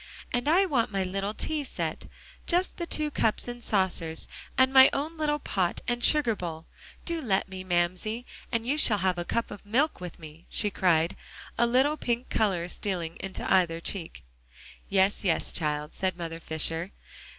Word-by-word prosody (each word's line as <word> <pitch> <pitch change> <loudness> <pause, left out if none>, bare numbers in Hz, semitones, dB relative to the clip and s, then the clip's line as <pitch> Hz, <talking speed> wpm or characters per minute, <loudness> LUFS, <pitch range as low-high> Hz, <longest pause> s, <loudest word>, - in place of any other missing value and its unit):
"And 245 +2 0
I 355 +6 +5
want 255 - +1
my 195 -1 0
little 195 +3 -3
tea 310 -2 -2
set 265 - -4 0.4
just 360 +2 +1
the 340 - -4
two 305 -2 -1
cups 225 -4 +1
and 240 0 -6
saucers 180 -5 +1 0.3
and 260 0 +4
my 265 0 +9
own 305 +4 -2
little 300 -2 0
pot 185 -11 -1
and 240 0 0
sugar 290 -8 +5
bowl. 165 -3 -6 0.4
Do 335 -1 -1
let 200 -8 +1
me, 190 -1 -7
Mamsie, 185 +6 -1 0.3
and 230 -1 0
you 285 +5 +1
shall 220 -7 +4
have 185 -2 0
a 175 - -3
cup 230 +5 -1
of 205 - -9
milk 250 +5 +1
with 180 -2 -7
me," 160 +1 -13
she 210 -2 +2
cried, 170 -4 +2 0.4
a 235 - +3
little 265 +5 +3
pink 240 -2 -2
color 190 -6 +1
stealing 175 -3 -3
into 195 -1 -5
either 170 -3 +3
cheek. 170 - -4 0.7
"Yes, 195 +1 +2
yes, 180 -5 +1
child," 150 -2 -2
said 185 -2 -2
Mother 165 -1 -5
Fisher. 165 +3 -2
200 Hz, 175 wpm, -28 LUFS, 175-255 Hz, 0.7 s, my